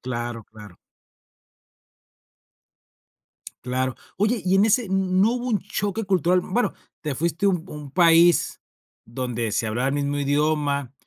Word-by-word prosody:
Claro, 120 -3 -5
claro. 105 -4 -14 2.9
Claro, 130 0 -1 0.2
oye, 210 +1 0
y 185 +1 +2
en 195 +2 +5
ese, 225 +2 +3
¿n 190 - -2 0.3
no 220 +4 +4
hubo 250 0 -3
un 215 -4 +1
choque 205 +4 -3
cultural?, 180 -1 +2
bueno, 240 +6 -1 0.3
te 150 -3 -3
fuiste 170 +6 -1
un 180 -4 +1
un 150 -2 -9
país 170 0 +4 0.4
donde 120 -1 -3
se 115 - 0
hablaba 120 +5 -1
el 140 - -1
mismo 145 0 -1
idioma, 145 -2 0
150 Hz, 135 wpm, -23 LUFS, 130-190 Hz, 2.9 s, en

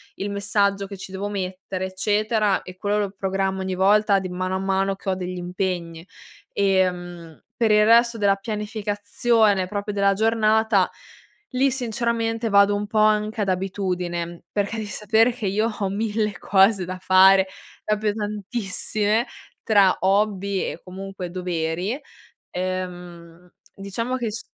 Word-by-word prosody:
il 200 - -4
messaggio 200 -1 0
che 200 - -8
ci 190 0 -9
devo 195 +2 -4
mettere, 190 -1 -4
eccetera, 210 +2 +1
e 185 0 -11
quello 205 +2 0
lo 200 -2 -1
programmo 195 0 -2
ogni 190 0 -2
volta 200 +2 +4
di 185 -1 -5
mano 185 +1 -2
a 190 - -1
mano 195 0 0
che 195 - -6
ho 185 - +1
degli 185 0 -5
impegni. 175 -2 -4 0.5
Ehm, 175 -4 -1
per 225 -2 +2
il 210 0 +5
resto 235 +1 +5
della 200 -2 +3
pianificazione, 210 0 0
proprio 205 +1 -4
della 200 0 +3
giornata, 220 -2 +2 0.6
lì 270 +2 +3
sinceramente 230 -2 -1
vado 200 0 +5
un 205 +1 -2
po' 215 0 0
anche 215 +1 +2
ad 200 - 0
abitudine, 180 -2 -3
perché 205 +1 -1
devi 220 - -3
sapere 220 +3 +2
che 235 -4 -4
io 210 +4 +1
ho 210 -3 -3
mille 210 -1 -1
cose 195 0 +3
da 185 +1 -5
fare 190 +1 +6 0.4
proprio 215 0 0
tantissime 210 +1 -1 0.4
tra 200 -4 +4
hobby 200 0 +1
e - - -10
comunque 190 0 -7
doveri. 180 - -2 0.5
Ehm, 180 -2 -6 0.3
diciamo 230 +6 -3
che 240 -3 -2
s 215 +2 -5
200 Hz, 145 wpm, -23 LUFS, 185-215 Hz, 0.6 s, fare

